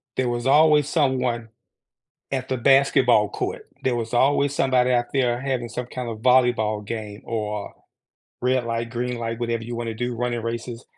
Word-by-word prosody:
There 130 -2 0
was 120 +1 -2
always 150 0 +5
someone 125 -7 0 0.8
at 130 -1 -2
the 130 - -1
basketball 130 -4 +4
court; - - -5 0.2
there 125 -2 +1
was 115 0 -4
always 140 +2 +2
somebody 130 -2 +2
out 120 -1 +1
there 125 -2 +1
having 130 -3 -2
some 120 +2 -5
kind 125 -2 -5
of 110 - -6
volleyball 115 -4 +2
game 105 -2 -6
or 105 -2 -4 0.7
red 130 0 +1
light, 115 0 -3
green 120 0 -3
light, 115 0 -4
whatever 115 -1 -2
you 120 +1 -6
wanna 115 -1 -3
do, 120 +1 -3
running 120 -1 -2
races. 115 +1 -5
120 Hz, 170 wpm, -23 LUFS, 115-130 Hz, 0.8 s, always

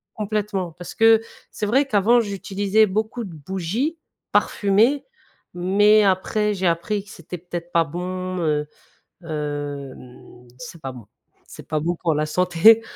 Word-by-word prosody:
Complètement, 205 -4 -2
parce 175 +1 -9
que 225 0 +5 0.3
c'est - - -4
vrai 260 +7 +3
qu'avant 230 +1 +4
j'utilisais 205 0 +1
beaucoup 220 +4 -2
de 190 -5 -8
bougies 190 - -3 0.3
parfumées 220 +8 +2 0.5
mais 205 +4 +4
après 205 +2 +1
j'ai 190 -2 -1
appris 175 +5 -1
que 200 - -18
c'était 170 +1 -8
peut-être 175 0 -7
pas 170 -1 +4
bon, 185 +3 -4
heu, 150 -3 0 0.6
hem 145 -5 -6
c'est 165 +2 -10
pas 135 -3 -5
bon 120 -5 -12 0.4
c'est - - -12
pas 155 -1 -1
bon 170 +3 -1
pour 165 -2 0
la 150 +1 0
santé 180 +7 +5
185 Hz, 145 wpm, -22 LUFS, 165-210 Hz, 0.6 s, que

